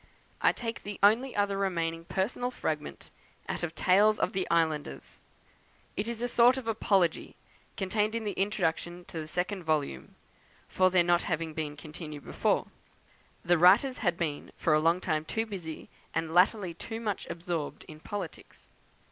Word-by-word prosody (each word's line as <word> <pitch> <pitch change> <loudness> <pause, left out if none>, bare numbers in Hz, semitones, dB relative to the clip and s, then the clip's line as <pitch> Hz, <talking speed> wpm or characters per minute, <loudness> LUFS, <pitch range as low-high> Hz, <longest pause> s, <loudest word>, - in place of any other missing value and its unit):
I - - +5
take 230 -1 -5
the 205 -1 -6
only 235 +6 +4
other 200 -1 +1
remaining 165 -4 -1
personal 215 +8 -1
fragment 250 - -4 0.4
out - - -3
of 170 -2 -3
"Tales 210 +3 +4
of - - 0
the 190 -1 -1
Islanders;" 160 -3 -1 0.7
it 205 - -2
is 235 0 -4
a - - +1
sort 245 +2 +5
of 255 -3 -6
apology, 195 -6 +1 0.4
contained 210 +3 0
in 230 - -2
the 210 - -1
introduction 175 -3 -1
to 165 - -6
the 155 - -5
second 180 +4 -2
volume, 150 - -2 0.5
for 185 0 +3
their 180 -1 +4
not 175 0 +3
having 160 -1 -2
been 150 -2 -4
continued 150 -1 -8
before; - - +1 0.8
the 175 -1 +4
writers 210 - +5
had 175 -6 +1
been 155 -4 -3
for 155 - +2
a 155 - +5
long 165 +3 +2
time 155 -4 0
too 220 +8 -2
busy, 180 -7 -7 0.3
and 165 0 -1
latterly 185 0 +3
too 225 +7 -6
much 210 -4 -3
absorbed 170 -3 -4
in 155 -1 -11
politics. 205 +5 -8
180 Hz, 165 wpm, -29 LUFS, 165-210 Hz, 0.8 s, I